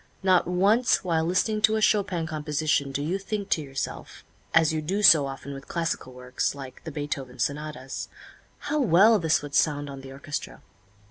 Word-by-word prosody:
Not 185 Hz, -3 st, +3 dB
once 200 Hz, +7 st, +3 dB
while 165 Hz, -3 st, +1 dB
listening 210 Hz, +5 st, 0 dB
to 215 Hz, +1 st, +4 dB
a -, -, +1 dB
Chopin 190 Hz, -6 st, +1 dB
composition 150 Hz, -2 st, -1 dB
do 140 Hz, +1 st, -3 dB
you 180 Hz, +6 st, -1 dB
think 200 Hz, 0 st, -4 dB
to 160 Hz, -, +2 dB
yourself, 135 Hz, -2 st, -6 dB, 0.3 s
as 160 Hz, -1 st, +4 dB
you 155 Hz, -, -1 dB
do 195 Hz, +7 st, -2 dB
so 155 Hz, -7 st, +7 dB
often 135 Hz, +1 st, -7 dB
with 135 Hz, 0 st, -10 dB
classical 165 Hz, -6 st, -3 dB
works, 125 Hz, +2 st, -3 dB
like 135 Hz, -2 st, -10 dB
the 160 Hz, -, -5 dB
Beethoven 140 Hz, -3 st, -5 dB
sonatas, 145 Hz, 0 st, -4 dB, 0.5 s
"How 300 Hz, +1 st, -1 dB
well 215 Hz, -, +5 dB
this 160 Hz, -3 st, +1 dB
would 145 Hz, -1 st, -8 dB
sound 145 Hz, -1 st, +1 dB
on 135 Hz, -1 st, -9 dB
the 135 Hz, 0 st, -11 dB
orchestra!" 140 Hz, +2 st, -6 dB
155 Hz, 180 wpm, -26 LUFS, 140-190 Hz, 0.5 s, so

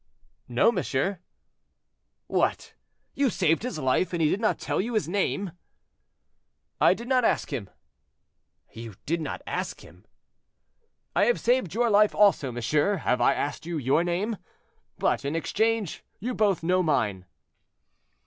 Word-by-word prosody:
"No, 120 Hz, -, +3 dB
monsieur." 180 Hz, -, -1 dB, 1.1 s
"What! -, -, -1 dB, 0.4 s
you 275 Hz, -1 st, +2 dB
saved 165 Hz, -6 st, +1 dB
his 250 Hz, -7 st, -4 dB
life, 155 Hz, +6 st, +1 dB
and 170 Hz, -, -1 dB
he 155 Hz, -2 st, +3 dB
did 205 Hz, -, -1 dB
not 215 Hz, -, +1 dB
tell -, -, -1 dB
you 230 Hz, +3 st, -4 dB
his 215 Hz, -, +1 dB
name?" 195 Hz, 0 st, -1 dB, 1.3 s
"I -, -, +5 dB
did 235 Hz, -, -9 dB
not 255 Hz, -1 st, +3 dB
ask -, -, 0 dB
him." 100 Hz, -6 st, -4 dB, 1.0 s
"You 115 Hz, -3 st, -9 dB
did 165 Hz, +2 st, -1 dB
not -, -, -5 dB
ask -, -, -4 dB
him?" -, -, -17 dB, 1.1 s
"I -, -, +4 dB
have 485 Hz, -, +2 dB
saved 240 Hz, -7 st, +1 dB
your 235 Hz, 0 st, +2 dB
life 210 Hz, +1 st, +4 dB
also, 200 Hz, -10 st, +4 dB
monsieur; 145 Hz, -, +1 dB
have 125 Hz, -9 st, 0 dB
I -, -, +4 dB
asked 145 Hz, +3 st, -3 dB
you 170 Hz, -1 st, -2 dB
your 140 Hz, +4 st, +2 dB
name? 190 Hz, +6 st, -1 dB, 0.6 s
But, -, -, 0 dB
in 140 Hz, +3 st, -2 dB
exchange, 220 Hz, +3 st, -1 dB, 0.2 s
you 245 Hz, +5 st, -3 dB
both 205 Hz, -7 st, +1 dB
know 185 Hz, +2 st, +2 dB
mine." 105 Hz, -, 0 dB
180 Hz, 150 wpm, -26 LUFS, 145-215 Hz, 1.3 s, I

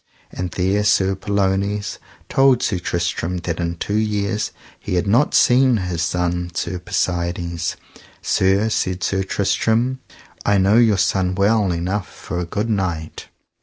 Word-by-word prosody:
And 90 Hz, 0 st, -4 dB
there 95 Hz, +3 st, +1 dB
Sir 95 Hz, -2 st, +3 dB
Pellounes 100 Hz, +1 st, -1 dB, 0.3 s
told 135 Hz, -2 st, +3 dB
Sir 95 Hz, -5 st, 0 dB
Tristram 85 Hz, 0 st, -2 dB
that 85 Hz, -1 st, -3 dB
in 85 Hz, 0 st, -2 dB
two 100 Hz, +5 st, -1 dB
years 105 Hz, 0 st, -1 dB, 0.3 s
he -, -, -3 dB
had 90 Hz, -, +1 dB
not 120 Hz, +8 st, +2 dB
seen 125 Hz, -1 st, +5 dB
his 90 Hz, -4 st, -3 dB
son, 90 Hz, +1 st, -1 dB
Sir 90 Hz, -, -2 dB
Persides. 85 Hz, -1 st, -2 dB, 0.4 s
Sir, 95 Hz, +3 st, +2 dB
said 95 Hz, -4 st, -1 dB
Sir 95 Hz, -1 st, 0 dB
Tristram, 110 Hz, +6 st, 0 dB, 0.4 s
I 100 Hz, 0 st, +3 dB
know 100 Hz, +3 st, +4 dB
your 115 Hz, -4 st, +4 dB
son 95 Hz, -1 st, +1 dB
well 100 Hz, 0 st, +2 dB
enough 90 Hz, +4 st, -2 dB
for 90 Hz, -, -6 dB
a 90 Hz, -, -2 dB
good 105 Hz, +6 st, -2 dB
knight. 90 Hz, -7 st, -3 dB
95 Hz, 145 wpm, -20 LUFS, 90-105 Hz, 0.4 s, seen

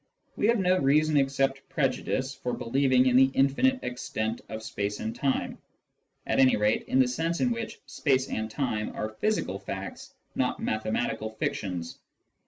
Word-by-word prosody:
We 210 Hz, -, +1 dB
have 235 Hz, +1 st, +4 dB
no 185 Hz, -2 st, +3 dB
reason 150 Hz, +3 st, +3 dB
except 135 Hz, 0 st, +1 dB
prejudice 135 Hz, -1 st, -1 dB
for 125 Hz, -, -4 dB
believ 130 Hz, +3 st, +1 dB
ing 130 Hz, 0 st, +5 dB
in 125 Hz, -1 st, +3 dB
the 130 Hz, +1 st, +7 dB
infinite 255 Hz, -, +3 dB
extent 115 Hz, -2 st, -3 dB
of 110 Hz, 0 st, -6 dB
space 105 Hz, -1 st, -3 dB
and 110 Hz, -, -4 dB
time, 135 Hz, -2 st, -1 dB, 0.7 s
at -, -, 0 dB
any 130 Hz, -1 st, +6 dB
rate 105 Hz, +1 st, +1 dB
in -, -, +1 dB
the 130 Hz, -1 st, +5 dB
sense 165 Hz, +7 st, -1 dB
in 250 Hz, -, +2 dB
which 230 Hz, -1 st, -4 dB
space 135 Hz, -3 st, +1 dB
and 110 Hz, 0 st, -3 dB
time 110 Hz, -4 st, -2 dB
are 110 Hz, -, -2 dB
physical 110 Hz, -, -1 dB
facts, -, -, -7 dB, 0.2 s
not -, -, 0 dB
mathematical 110 Hz, 0 st, -1 dB
fictions. 90 Hz, -5 st, -4 dB
130 Hz, 165 wpm, -28 LUFS, 110-140 Hz, 0.7 s, the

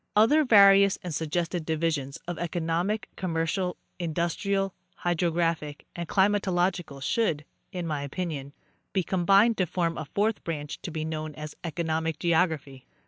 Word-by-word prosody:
Other 275 Hz, +9 st, +5 dB
various 200 Hz, -5 st, +7 dB
and 175 Hz, -3 st, -4 dB
suggested 165 Hz, +3 st, -1 dB
divisions 155 Hz, -4 st, -1 dB
of 175 Hz, -2 st, -4 dB
economic, 175 Hz, +5 st, -1 dB
commercial, 180 Hz, +1 st, -1 dB, 0.2 s
industrial, 180 Hz, +4 st, -1 dB, 0.2 s
hydrographic 165 Hz, -3 st, -1 dB
and 170 Hz, -1 st, -5 dB
climatological 185 Hz, -7 st, +1 dB
should, 155 Hz, -6 st, 0 dB, 0.3 s
in 180 Hz, -2 st, -4 dB
my 150 Hz, -3 st, -2 dB
opinion, 145 Hz, -2 st, -4 dB, 0.4 s
be 190 Hz, -, +1 dB
com 175 Hz, -1 st, -1 dB
bined 210 Hz, +4 st, +6 dB
to 185 Hz, -, +1 dB
form 165 Hz, 0 st, -1 dB
afourth 205 Hz, +8 st, -1 dB
branch 150 Hz, -3 st, -5 dB
to -, -, -5 dB
be 155 Hz, -1 st, -3 dB
known 155 Hz, -1 st, -4 dB
as 150 Hz, -1 st, -7 dB
economic 160 Hz, -1 st, -1 dB
geography. 160 Hz, -6 st, 0 dB
170 Hz, 135 wpm, -27 LUFS, 155-190 Hz, 0.4 s, various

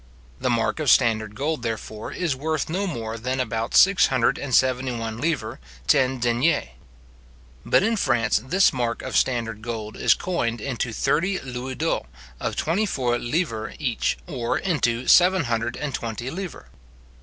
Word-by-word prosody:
The -, -, 0 dB
mark 120 Hz, +5 st, 0 dB
of 150 Hz, -4 st, +1 dB
standard 110 Hz, -3 st, +3 dB
gold, 150 Hz, +2 st, -2 dB
therefore, 110 Hz, -2 st, -5 dB
is 170 Hz, -7 st, -1 dB
worth 155 Hz, +3 st, -2 dB
no 195 Hz, +3 st, -1 dB
more 115 Hz, -8 st, -4 dB
than 130 Hz, +3 st, -2 dB
about 115 Hz, -2 st, -2 dB
six 190 Hz, -3 st, +6 dB
hundred 130 Hz, -3 st, +1 dB
and 130 Hz, -4 st, -1 dB
seventy 130 Hz, 0 st, +2 dB
one 115 Hz, -1 st, -4 dB
livres 155 Hz, 0 st, -2 dB, 0.3 s
ten 130 Hz, -1 st, +3 dB
deniers. 120 Hz, -, +1 dB, 0.9 s
But -, -, +3 dB
in 225 Hz, +2 st, +2 dB
France 120 Hz, -, +2 dB
this 185 Hz, +9 st, +3 dB
mark 120 Hz, -3 st, -2 dB
of -, -, -5 dB
standard 115 Hz, -4 st, 0 dB
gold 110 Hz, -2 st, -5 dB
is -, -, +4 dB
coined 120 Hz, -11 st, -2 dB
into 125 Hz, 0 st, -3 dB
thirty 185 Hz, -, +1 dB
louis 130 Hz, -1 st, -6 dB
d'ors 160 Hz, -, -1 dB, 0.3 s
of -, -, -3 dB
twenty 195 Hz, +7 st, 0 dB
four 120 Hz, -7 st, 0 dB
livres 120 Hz, -5 st, -2 dB
each, 125 Hz, -7 st, -1 dB
or 125 Hz, -8 st, -2 dB
into 125 Hz, -9 st, 0 dB
seven 185 Hz, -1 st, +6 dB
hundred 120 Hz, -1 st, -2 dB
and 145 Hz, -2 st, -4 dB
twenty 120 Hz, +3 st, -4 dB
livres. 185 Hz, 0 st, -6 dB
125 Hz, 160 wpm, -24 LUFS, 115-155 Hz, 0.9 s, six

